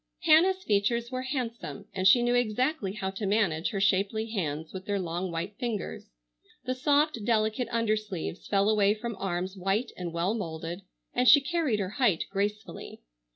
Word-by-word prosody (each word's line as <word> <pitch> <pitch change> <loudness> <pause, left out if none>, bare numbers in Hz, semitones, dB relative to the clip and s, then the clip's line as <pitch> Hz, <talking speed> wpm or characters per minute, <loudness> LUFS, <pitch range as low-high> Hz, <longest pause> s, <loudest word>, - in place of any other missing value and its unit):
Hannah's 365 +4 +4
features 235 - +1
were 255 0 -2
handsome 245 -6 -4
and 190 0 +2
she 240 +5 +6
knew 240 0 +2
exactly 245 -1 0
how 190 -2 -3
to 195 +1 -4
manage 195 -6 +1
her 195 - -3
shapely 200 +3 +1
hands 160 -6 -3
with 190 0 -7
their 205 -1 0
long 175 0 -3
white 170 +5 -5
fingers. 235 -4 -4 0.6
The 255 - 0
soft 285 -2 +1
delicate 220 +2 +1
undersleeves 215 -7 -2
fell 200 0 +2
away 210 -1 +3
from 230 +1 -5
arms 185 0 -3
white 195 +6 -1
and 175 -2 -5
well 170 +5 0
moulded, 170 -3 -5 0.3
and 250 +1 +1
she 285 - +9
carried 275 -5 0
her 190 -2 -2
height 200 -10 +3
gracefully. 205 +2 -4
210 Hz, 165 wpm, -28 LUFS, 190-240 Hz, 0.6 s, she